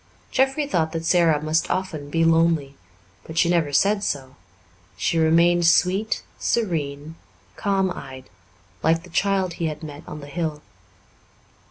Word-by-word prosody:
Jeffrey 270 Hz, +3 st, +1 dB
thought 165 Hz, -, -1 dB
that 165 Hz, 0 st, -3 dB
Sara 165 Hz, -4 st, +3 dB
must 155 Hz, +1 st, 0 dB
often 165 Hz, -6 st, -3 dB
be 165 Hz, +2 st, +1 dB
lonely, 165 Hz, -4 st, +2 dB, 0.5 s
but 160 Hz, -, -9 dB
she 170 Hz, -, +4 dB
never 165 Hz, -4 st, +1 dB
said 200 Hz, +7 st, +2 dB
so; 135 Hz, -6 st, -3 dB, 0.6 s
she 165 Hz, -, 0 dB
remained 170 Hz, +2 st, +4 dB
sweet, 190 Hz, +5 st, +2 dB, 0.2 s
serene, 155 Hz, -8 st, -2 dB, 0.4 s
calm 195 Hz, -2 st, 0 dB
eyed, 130 Hz, -5 st, -9 dB, 0.5 s
like 165 Hz, +1 st, +2 dB
the 180 Hz, -, -14 dB
child 190 Hz, 0 st, +1 dB
he 165 Hz, -, -2 dB
had 155 Hz, +1 st, -6 dB
met 145 Hz, -1 st, -8 dB
on 150 Hz, -, -7 dB
the 145 Hz, -, -9 dB
hill. 150 Hz, 0 st, -4 dB
165 Hz, 145 wpm, -23 LUFS, 150-180 Hz, 0.6 s, she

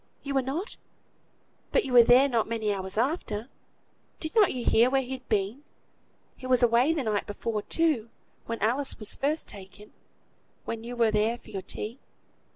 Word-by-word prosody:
you 280 Hz, -1 st, -4 dB
were 270 Hz, -, +3 dB
not; 295 Hz, -, -4 dB, 0.9 s
but -, -, +2 dB
you 260 Hz, -, -4 dB
were 245 Hz, -, +10 dB
there 245 Hz, +4 st, +6 dB
not 235 Hz, -5 st, 0 dB
many 220 Hz, -2 st, -1 dB
hours 190 Hz, 0 st, -5 dB
after. 235 Hz, -3 st, -1 dB, 0.7 s
Did 315 Hz, -, -5 dB
not 430 Hz, -4 st, +5 dB
you 250 Hz, -2 st, -4 dB
hear 235 Hz, +3 st, +5 dB
where 270 Hz, 0 st, +1 dB
he'd 260 Hz, 0 st, -7 dB
been? 210 Hz, +6 st, -1 dB, 0.7 s
He 255 Hz, -, -9 dB
was 255 Hz, -1 st, +3 dB
away 240 Hz, +5 st, +4 dB
the 315 Hz, -4 st, -1 dB
night 210 Hz, -3 st, -1 dB
before, 210 Hz, +1 st, -3 dB
too, 295 Hz, -5 st, +1 dB, 0.4 s
when 230 Hz, -, -3 dB
Alice 265 Hz, +6 st, 0 dB
was 215 Hz, -3 st, -2 dB
first 300 Hz, +3 st, -1 dB
taken; 200 Hz, +1 st, -12 dB, 0.7 s
when 225 Hz, -1 st, -5 dB
you 245 Hz, +1 st, -6 dB
were 230 Hz, -2 st, +3 dB
there 215 Hz, +3 st, +1 dB
for -, -, -16 dB
your 195 Hz, -2 st, -4 dB
tea. 225 Hz, +6 st, -6 dB
240 Hz, 175 wpm, -27 LUFS, 215-270 Hz, 0.9 s, were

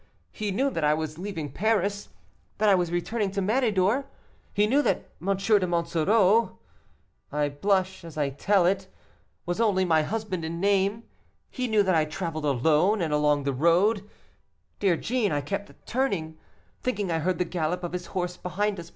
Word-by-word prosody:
He 215 Hz, -2 st, -4 dB
knew 265 Hz, +8 st, 0 dB
that 165 Hz, -, -3 dB
I 150 Hz, 0 st, +4 dB
was 155 Hz, 0 st, -5 dB
leaving 175 Hz, -7 st, -5 dB
Paris, 205 Hz, +1 st, 0 dB, 0.5 s
that 215 Hz, -, +2 dB
I 200 Hz, -, +6 dB
was 175 Hz, -3 st, +1 dB
returning 200 Hz, +4 st, -1 dB
to 200 Hz, -, -1 dB
Méridor; 215 Hz, +2 st, +1 dB, 0.5 s
he 205 Hz, -, +2 dB
knew 270 Hz, +7 st, +3 dB
that -, -, -1 dB
M. 195 Hz, +1 st, 0 dB
de 195 Hz, -1 st, +2 dB
Monsoreau 180 Hz, +6 st, +2 dB, 0.7 s
I 150 Hz, 0 st, 0 dB
blush 190 Hz, +5 st, 0 dB
as 165 Hz, -2 st, -10 dB
I 145 Hz, -2 st, 0 dB
tell 185 Hz, +6 st, +2 dB
it 190 Hz, +1 st, +1 dB, 0.6 s
was 175 Hz, +5 st, -1 dB
only 195 Hz, -4 st, +2 dB
my 160 Hz, -3 st, +3 dB
husband 200 Hz, 0 st, -3 dB
in 165 Hz, +1 st, -4 dB
name; 200 Hz, +3 st, +1 dB, 0.5 s
he 255 Hz, -2 st, -2 dB
knew 215 Hz, -2 st, +3 dB
that 190 Hz, -1 st, +2 dB
I 160 Hz, -2 st, +3 dB
traveled 160 Hz, -1 st, -4 dB
alone; 155 Hz, -, +3 dB
and 160 Hz, -4 st, -1 dB
along 150 Hz, -1 st, +2 dB
the 140 Hz, 0 st, -1 dB
road, 190 Hz, -, +2 dB, 0.7 s
dear 190 Hz, -5 st, +2 dB
Jeanne, 235 Hz, -1 st, 0 dB
I 145 Hz, -1 st, 0 dB
kept 200 Hz, +7 st, -6 dB
turning, 185 Hz, -12 st, -2 dB, 0.4 s
thinking 205 Hz, -7 st, -1 dB
I 165 Hz, -, +1 dB
heard 180 Hz, +2 st, 0 dB
the 180 Hz, -, 0 dB
gallop 175 Hz, +1 st, -2 dB
of 175 Hz, -, -4 dB
his 180 Hz, -1 st, -4 dB
horse 180 Hz, -1 st, -3 dB
behind 200 Hz, +2 st, -2 dB
us. 170 Hz, 0 st, -9 dB
185 Hz, 175 wpm, -26 LUFS, 165-205 Hz, 0.7 s, I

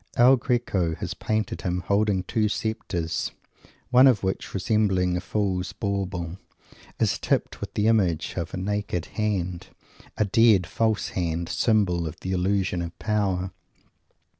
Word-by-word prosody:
El 125 Hz, +3 st, +7 dB
Greco 115 Hz, -10 st, 0 dB
has -, -, -4 dB
painted 110 Hz, +1 st, -2 dB
him 90 Hz, -2 st, -1 dB
holding 100 Hz, 0 st, +1 dB
two 105 Hz, +2 st, 0 dB
sceptres, 90 Hz, -7 st, -2 dB, 0.6 s
one 130 Hz, +2 st, +8 dB
of 120 Hz, -7 st, +3 dB
which, 95 Hz, 0 st, -2 dB
resembling 95 Hz, -3 st, +1 dB
a 90 Hz, -, -1 dB
Fool's 95 Hz, -2 st, -1 dB
Bauble, 95 Hz, -3 st, -3 dB, 0.6 s
is -, -, +1 dB
tipped -, -, -1 dB
with -, -, -6 dB
the 105 Hz, -, +1 dB
image 95 Hz, -8 st, +2 dB
of 85 Hz, -3 st, -3 dB
a -, -, -5 dB
naked 100 Hz, -2 st, -2 dB
hand 95 Hz, -5 st, -2 dB, 0.5 s
a 105 Hz, -, +2 dB
dead, 105 Hz, -2 st, +4 dB
false 110 Hz, +5 st, 0 dB
hand 85 Hz, -1 st, -2 dB
symbol 95 Hz, -8 st, +2 dB
of 75 Hz, -, -8 dB
the 95 Hz, -, -3 dB
illusion 95 Hz, -1 st, 0 dB
of 85 Hz, 0 st, -6 dB
Power. 95 Hz, -4 st, 0 dB
95 Hz, 140 wpm, -25 LUFS, 90-110 Hz, 0.6 s, one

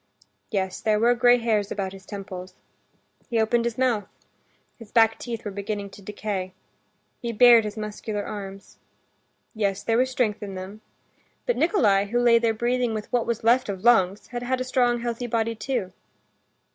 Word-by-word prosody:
Yes, 190 Hz, -3 st, -2 dB
there 215 Hz, -1 st, +2 dB
were 235 Hz, +2 st, +4 dB
gray 245 Hz, 0 st, +5 dB
hairs 220 Hz, -4 st, 0 dB
about 195 Hz, -2 st, -3 dB
his 190 Hz, -1 st, -13 dB
temples. 185 Hz, -2 st, -8 dB, 0.7 s
He 230 Hz, -, +1 dB
opened 230 Hz, +2 st, +2 dB
his 235 Hz, -1 st, -2 dB
mouth. 240 Hz, -6 st, +1 dB, 0.7 s
His 230 Hz, -3 st, -13 dB
back 225 Hz, -1 st, +4 dB
teeth 230 Hz, -2 st, -6 dB
were 205 Hz, -, -3 dB
beginning 200 Hz, 0 st, -4 dB
to 200 Hz, -, -13 dB
decay. 195 Hz, -2 st, -4 dB, 0.7 s
He 235 Hz, -, -3 dB
bared 230 Hz, 0 st, +7 dB
his 210 Hz, +1 st, -5 dB
muscular 210 Hz, 0 st, -4 dB
arms. 195 Hz, -1 st, -8 dB, 0.7 s
Yes, 200 Hz, -3 st, -1 dB
there 225 Hz, +1 st, +2 dB
was 255 Hz, +1 st, +2 dB
strength 245 Hz, -5 st, -1 dB
in 200 Hz, -2 st, -6 dB
them. 190 Hz, +3 st, -8 dB, 0.6 s
But -, -, +1 dB
Nikolay, 210 Hz, -, +3 dB
who 240 Hz, +4 st, 0 dB
lay 235 Hz, -1 st, +5 dB
there 230 Hz, -1 st, +2 dB
breathing 240 Hz, +1 st, 0 dB
with 215 Hz, +3 st, -6 dB
what 240 Hz, -2 st, +1 dB
was 235 Hz, -1 st, -2 dB
left 240 Hz, +1 st, +3 dB
of 190 Hz, -2 st, -5 dB
lungs, 205 Hz, -5 st, +3 dB
had 240 Hz, 0 st, -5 dB
had 255 Hz, +1 st, -1 dB
a -, -, -1 dB
strong, 245 Hz, -2 st, +1 dB
healthy 240 Hz, 0 st, -3 dB
body 230 Hz, -1 st, 0 dB
too. 220 Hz, -4 st, -3 dB
220 Hz, 175 wpm, -25 LUFS, 200-240 Hz, 0.7 s, bared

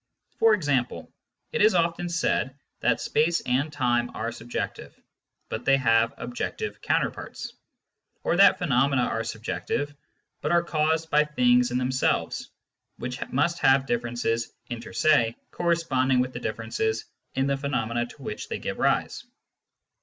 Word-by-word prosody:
For 225 Hz, -1 st, +6 dB
example, 140 Hz, -9 st, -1 dB, 0.4 s
it -, -, 0 dB
is 215 Hz, -1 st, +5 dB
often 170 Hz, 0 st, +1 dB
said 145 Hz, -5 st, 0 dB, 0.2 s
that 115 Hz, 0 st, +2 dB
space 165 Hz, +3 st, +2 dB
and 130 Hz, +5 st, 0 dB
time 120 Hz, -4 st, +1 dB
are 115 Hz, +2 st, -2 dB
subjective, 120 Hz, +1 st, -6 dB, 0.5 s
but 110 Hz, -, -4 dB
they 135 Hz, +1 st, +4 dB
have 115 Hz, -3 st, +3 dB
objective 120 Hz, 0 st, -4 dB
counterparts; -, -, -2 dB, 0.7 s
or -, -, +1 dB
that 200 Hz, +1 st, +7 dB
phenomena 135 Hz, -5 st, +2 dB
are 115 Hz, -1 st, -1 dB
subjective, 140 Hz, +6 st, -3 dB, 0.5 s
but -, -, -1 dB
are 170 Hz, 0 st, +4 dB
caused 160 Hz, 0 st, 0 dB
by 150 Hz, +1 st, +5 dB
things 125 Hz, -4 st, +3 dB
in 125 Hz, -, -1 dB
themselves, 130 Hz, 0 st, 0 dB, 0.5 s
which 125 Hz, +2 st, -5 dB
must 170 Hz, +6 st, +1 dB
have 135 Hz, 0 st, +4 dB
differences 120 Hz, -2 st, -1 dB, 0.2 s
inter 120 Hz, -1 st, -6 dB
se 115 Hz, -7 st, +3 dB, 0.2 s
corresponding 140 Hz, -7 st, +1 dB
with 125 Hz, 0 st, 0 dB
the -, -, -5 dB
differences 110 Hz, 0 st, -2 dB, 0.3 s
in 135 Hz, -, +1 dB
the 140 Hz, 0 st, +1 dB
phenomena 120 Hz, -4 st, -1 dB
to -, -, -14 dB
which -, -, -5 dB
they -, -, -2 dB
give -, -, -5 dB
rise. -, -, +1 dB
130 Hz, 140 wpm, -26 LUFS, 120-155 Hz, 0.7 s, that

